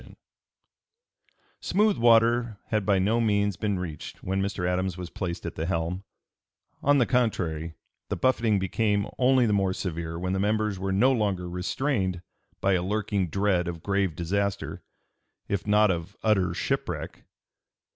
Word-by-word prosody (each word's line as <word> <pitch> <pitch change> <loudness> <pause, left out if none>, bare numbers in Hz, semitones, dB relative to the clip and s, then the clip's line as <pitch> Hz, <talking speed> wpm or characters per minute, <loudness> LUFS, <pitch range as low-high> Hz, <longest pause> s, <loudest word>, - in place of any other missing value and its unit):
] 470 +2 -42
Smooth 210 0 +2
water 115 -1 +4
had 105 -3 0
by 100 -2 +4
no 105 +5 +2
means 100 -3 +1
been 105 +1 -1
reached 85 -5 -7
when 95 +1 -1
Mr. 95 -2 -2
Adams 90 0 -1
was 90 -1 -7
placed 90 -2 -4
at 85 - -4
the 80 +1 -3
helm; 90 +1 -2 0.8
on 145 +1 +4
the 125 - +4
contrary, 85 -11 0 0.3
the - - -1
buffeting 115 -5 +2
became 100 +2 0
only 130 -1 +4
the 105 - +2
more 95 -2 +2
severe 85 -3 -4
when 90 +2 -2
the 95 - 0
members 105 -1 0
were 95 0 -2
no 110 +8 +4
longer 100 -7 0
restrained 95 +1 -1 0.4
by 95 - +3
a 90 - +2
lurking 100 0 -1
dread 95 -1 +1
of 85 -2 -5
grave 100 -4 0
disaster 100 +3 -2 0.7
if 100 0 -2
not 105 -1 +5
of 85 +3 -5
utter 95 -5 +2
shipwreck. - - -3
100 Hz, 155 wpm, -27 LUFS, 90-110 Hz, 0.8 s, not